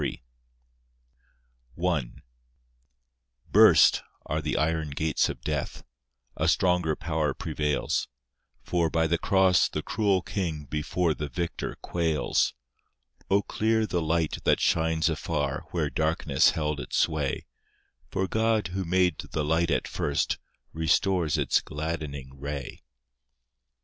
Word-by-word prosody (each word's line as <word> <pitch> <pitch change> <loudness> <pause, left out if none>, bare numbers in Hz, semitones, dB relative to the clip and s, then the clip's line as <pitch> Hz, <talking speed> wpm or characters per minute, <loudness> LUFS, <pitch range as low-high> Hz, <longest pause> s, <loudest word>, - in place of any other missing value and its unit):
I 75 -9 0 1.4
Burst - - +7 0.2
are 75 +2 -2
the 75 - -2
iron 80 -1 0
gates 75 +2 0
of - - -6
death— - - -3 0.5
A - - 0
stronger 90 -4 +2
power 80 -3 -1
prevails; 75 -2 -1 0.6
For, 85 -2 +1
by 80 +1 +1
the 85 +1 +1
cross, 95 -2 +3
the - - -4
cruel 100 -4 +1
king 80 -7 -3
Before 75 +4 0
the 75 -1 -5
Victor 85 +6 -4
quails, 80 -3 0 0.7
O 100 +1 +3
clear 110 +2 +1
the 90 -4 -1
light 80 0 0
that - - +3
shines 80 -1 +2
afar, - - -2
Where - - -1
darkness 80 -3 +2
held 75 -2 -1
its - - -3
sway, 75 -4 0 0.6
For 95 - -1
God, 110 -2 +1
who 95 +1 -3
made 90 -1 +2
the 75 -1 -3
light 80 +3 +1
at - - 0
first, 70 - -1 0.3
Restores 80 +1 +1
its - - +2
gladdening 75 -3 -5
ray. 70 -2 -6
80 Hz, 120 wpm, -27 LUFS, 75-90 Hz, 1.4 s, Burst